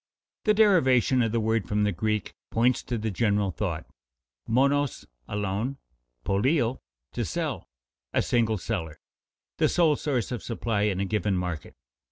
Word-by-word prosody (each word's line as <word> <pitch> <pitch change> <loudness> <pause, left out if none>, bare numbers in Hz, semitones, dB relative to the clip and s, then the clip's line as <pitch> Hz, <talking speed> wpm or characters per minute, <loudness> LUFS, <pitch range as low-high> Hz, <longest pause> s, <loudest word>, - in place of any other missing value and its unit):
_ - - -68
The 215 -1 +4
derivation 135 - +4
of 115 -2 +1
the 115 - +1
word 110 -1 0
from 105 0 +1
the 105 - +2
Greek 105 +1 -1 0.2
points 120 +2 +2
to 120 - -2
the 110 0 -2
general 100 -1 +1
thought: 80 - -3 0.6
monos, 140 +4 +2 0.2
alone, 105 +6 -2 0.5
poléo, 120 +5 +1 0.3
to - - -2
sell, - - -3 0.4
a - - +1
single 115 -3 +1
seller, 80 -7 -4 0.6
the - - +3
sole 165 -4 +4
source 130 -6 -1
of 120 - -3
supply 110 -3 -1
in 95 -2 -2
a 100 - 0
given 100 -1 0
market. 90 -4 -4
110 Hz, 155 wpm, -27 LUFS, 100-130 Hz, 0.6 s, The